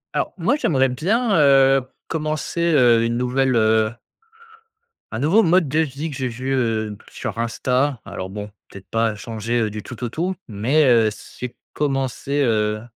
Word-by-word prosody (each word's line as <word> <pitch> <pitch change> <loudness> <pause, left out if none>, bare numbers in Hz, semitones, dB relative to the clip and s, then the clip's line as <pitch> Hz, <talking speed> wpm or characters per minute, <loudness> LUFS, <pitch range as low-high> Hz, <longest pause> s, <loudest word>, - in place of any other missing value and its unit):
Alors - - 0
moi - - +1
j'aimerais 135 - +2
bien, 205 - +1
heu, 135 -1 +5 0.3
commencer, 155 +1 -3
heu, 125 -9 +4
une 115 0 0
nouvelle, 130 +1 +1
heu 110 0 +3 1.2
un 110 - -4
nouveau 170 - +4
mode 175 -1 +3
de 150 +4 0
vie 155 0 -2
que 145 - -7
j'ai 130 -1 -2
vu, 130 +3 -3
heu, 115 -4 0
b 105 - -11
sur - - -6
Insta. 125 +3 0
Alors 95 - -6
bon, 105 +1 -6 0.2
peut-être 100 -1 -12
pas 115 -1 0
changer, 115 +2 -3
heu, 110 - 0
du 105 0 -7
tout 125 -1 -9
au 120 - -1
tout, 175 +9 -2
mais, 120 +9 +2
heu, 115 -4 +5
c'est 125 +3 -9 0.2
commencer, 140 0 -1
heu, 105 -3 +1
125 Hz, 170 wpm, -21 LUFS, 115-145 Hz, 1.2 s, heu